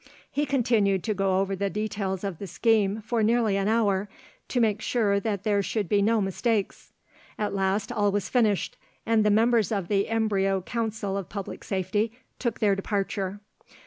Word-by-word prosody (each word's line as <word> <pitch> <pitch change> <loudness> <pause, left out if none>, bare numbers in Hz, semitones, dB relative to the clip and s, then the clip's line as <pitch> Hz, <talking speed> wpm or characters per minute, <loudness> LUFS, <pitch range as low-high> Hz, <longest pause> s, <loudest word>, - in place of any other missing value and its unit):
He 295 0 0
continued 230 -8 +2
to 215 - 0
go 195 -1 +1
over 195 0 0
the 200 +1 -1
details 200 -2 -3
of 195 -5 -4
the 200 - -6
scheme 215 +2 +1
for 230 +1 0
nearly 220 -2 +2
an 195 0 0
hour, 205 -3 +1 0.4
to 250 - -1
make 215 -2 +2
sure 210 -5 +1
that 200 -2 -2
there 205 -2 +2
should 205 0 -2
be 200 +3 +2
no 220 +2 +3
mistakes. 205 +2 -1 0.5
At 210 -1 -2
last 195 +1 0
all 205 -1 +1
was 200 -1 -1
finished, 220 -6 +1 0.3
and 225 -1 +3
the 210 - +3
members 225 +1 +3
of 195 -5 -2
the 200 0 +1
embryo 200 -4 +1
Council 220 -2 -3
of 195 - -5
Public 200 -2 -6
Safety 205 +3 -1 0.3
took 235 -4 -1
their 205 -2 +3
departure. 195 0 -2
205 Hz, 175 wpm, -26 LUFS, 195-225 Hz, 0.5 s, no